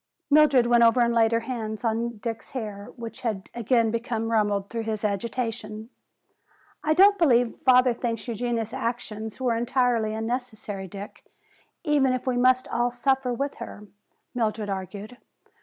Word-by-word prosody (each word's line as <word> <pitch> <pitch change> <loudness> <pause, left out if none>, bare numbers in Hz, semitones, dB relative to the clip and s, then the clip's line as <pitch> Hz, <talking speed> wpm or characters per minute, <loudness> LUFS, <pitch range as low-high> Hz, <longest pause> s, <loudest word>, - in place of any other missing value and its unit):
Mildred 285 -5 +6
went 240 0 +5
over 230 +2 +5
and 235 0 +3
laid 225 -1 +4
her 230 0 +1
hands 225 -3 -5
on 230 0 -1
Dick's 225 +1 -5
hair, 210 -5 -5
which 230 -2 -8
had 215 -6 -3
again 230 -1 +2
become 230 -1 -2
rumpled 205 -3 +1
through 230 +2 -4
his 220 -1 -3
agitation. 220 +1 -3 0.9
"I 310 0 +2
don't 400 +3 +6
believe 245 -7 +3
father 250 -1 +5
thinks 230 -1 -4
Eugenia's 235 -1 -2
action 230 -2 -3
was 220 - -8
entirely 240 -2 +1
unnecessary, 220 -4 -4
Dick, 200 +3 -9 0.6
even 290 -5 +3
if 255 - -3
we 255 -1 0
must 255 +1 +3
all 240 +1 +1
suffer 260 +1 0
with 275 +4 -2
her," 210 - -8 0.5
Mildred 215 -3 -1
argued. 200 +5 -6
235 Hz, 150 wpm, -25 LUFS, 220-250 Hz, 0.9 s, Mildred